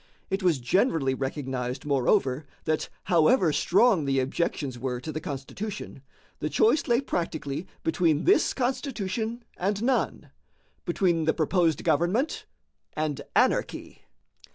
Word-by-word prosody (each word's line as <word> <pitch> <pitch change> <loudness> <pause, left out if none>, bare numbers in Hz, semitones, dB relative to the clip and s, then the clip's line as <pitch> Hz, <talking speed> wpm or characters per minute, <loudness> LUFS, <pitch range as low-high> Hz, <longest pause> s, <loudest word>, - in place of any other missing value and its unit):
It 195 +2 0
was 175 -5 +3
generally 135 - +1
recognized, 130 -2 -3
moreover, 140 0 +1 0.2
that 155 -1 -1
however 170 - +4
strong 190 -2 +3
the 135 -1 +1
objections 135 -1 -2
were 125 -1 -2
to 140 +5 -6
the 155 +1 -4
Constitution, 155 +3 -6 0.4
the 150 - -2
choice 250 - +3
lay 240 +1 +3
practically 165 - -3 0.2
between 160 -2 +2
this 395 - +3
Constitution 235 -3 -2
and 200 +3 -1
none, 260 +1 0 0.5
between 175 -2 +1
the 160 - +2
proposed 165 -1 +1
government 255 - +1 0.5
and 155 -2 -2
anarchy. - - 0
165 Hz, 120 wpm, -27 LUFS, 140-210 Hz, 0.5 s, however